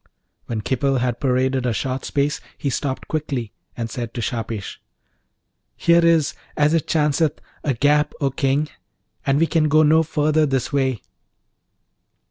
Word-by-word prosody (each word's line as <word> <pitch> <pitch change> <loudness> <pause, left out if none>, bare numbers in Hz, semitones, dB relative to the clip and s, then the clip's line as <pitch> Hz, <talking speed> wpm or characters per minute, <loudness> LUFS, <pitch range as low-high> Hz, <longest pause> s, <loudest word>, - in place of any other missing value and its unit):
When 115 -2 -3
Khipil 135 +4 0
had 125 -1 -1
paraded 130 -1 +1
a 120 - +1
short 130 +3 -3
space 145 +1 0 0.2
he 140 - -2
stopped 130 0 -3
quickly, 140 -8 -3 0.2
and 115 -1 -2
said 120 0 -6
to - - -3
Shahpesh, 115 -2 -4 1.0
'Here 170 0 +4
is, 165 -3 +3 0.2
as 150 +1 +3
it 165 -3 +1
chanceth, 150 0 +1 0.2
a 140 -4 0
gap, 145 +4 +2
O 140 -2 +1
King! 135 +3 +1 0.6
and 135 0 +3
we 165 - +4
can 160 -2 +2
go 155 +2 +5
no 155 +2 +5
further 155 -1 +1
this 135 0 -1
way.' 130 -6 0
140 Hz, 150 wpm, -21 LUFS, 125-155 Hz, 1.0 s, go